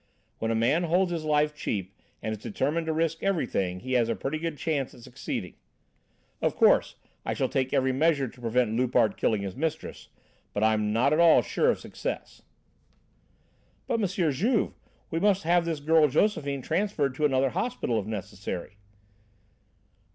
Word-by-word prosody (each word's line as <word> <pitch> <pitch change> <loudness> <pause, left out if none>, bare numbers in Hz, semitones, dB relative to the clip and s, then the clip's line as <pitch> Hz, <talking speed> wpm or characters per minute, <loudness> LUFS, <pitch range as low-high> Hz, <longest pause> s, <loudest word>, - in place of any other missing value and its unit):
When 115 - -1
a 115 - +1
man 135 +10 +2
holds 175 +2 +2
his 165 -2 -3
life 150 0 +2
cheap 100 -9 -3 0.3
and 110 - -2
is 110 -1 -5
determined 160 +11 -1
to - - +1
risk 165 0 -1
everything, 100 - -1
he 130 - -6
has 120 -2 +3
a 115 - 0
pretty 135 +10 -3
good 165 -2 -3
chance 145 -5 -2
of 120 - -15
succeeding. 125 0 -5 0.9
Of - - +1
course - - +4 0.3
I - - -2
shall - - 0
take 130 -1 -1
every 130 0 +2
measure 140 0 +2
to 125 +1 -14
prevent 120 0 +1
Loupart 120 -3 +2
killing 105 -3 0
his 95 -1 -5
mistress, 160 +1 -4 0.5
but 105 - 0
I'm 110 -1 +2
not 125 +7 +3
at 155 - +2
all 170 -1 +6
sure 470 - +1
of - - +1
success." - - -6 1.4
"But 230 - 0
M. 200 - +2 0.2
Juve, 215 - +1 0.4
we 165 - 0
must 200 0 +2
have 170 +1 +3
this 165 -3 -2
girl 155 +1 +4
Josephine 140 -4 0
transferred 165 -9 0
to 150 +3 0
another 135 -2 +2
hospital 185 - -1
if 100 - -6
necessary." 100 -3 -6
140 Hz, 170 wpm, -27 LUFS, 115-165 Hz, 1.4 s, all